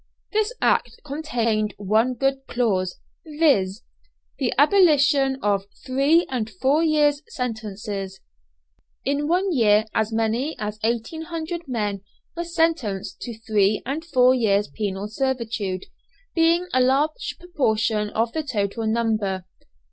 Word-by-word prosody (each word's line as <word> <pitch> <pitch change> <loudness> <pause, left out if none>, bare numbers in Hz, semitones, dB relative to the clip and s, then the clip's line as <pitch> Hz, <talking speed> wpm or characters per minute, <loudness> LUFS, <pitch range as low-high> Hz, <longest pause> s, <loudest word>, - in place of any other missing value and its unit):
This 430 +1 +1
Act - - +1
contained 230 -8 -1
one 220 +5 +1
good 270 +2 -1
clause, 195 -7 0 0.3
viz., 280 - +1 0.6
the 260 -4 +1
abolition 285 -5 +4
of 200 -1 +1 0.2
three 280 +6 +3
and 235 -4 -2
four 265 - +1
years' 295 -2 +3
sentences. 210 -5 -5 0.9
In 285 +2 0
one 365 +4 +1
year 215 -5 +4
as 220 0 0
many 225 +7 0
as 210 -1 -4
1800 320 +8 -3
men 210 -6 -2 0.3
were 340 - -2
sentenced 320 - -1
to 235 -3 -6
three 210 -2 +2
and 285 +6 -3
four 255 -6 +4
years' 210 -5 +2
penal 200 -1 -3
servitude, 225 -6 -2 0.5
being 335 +1 +3
a 255 - +4
large 275 +5 +1
proportion 220 -11 0
of 225 +2 0
the 315 - -1
total 220 -5 -2
number. 215 -5 0
240 Hz, 120 wpm, -23 LUFS, 210-295 Hz, 0.9 s, abolition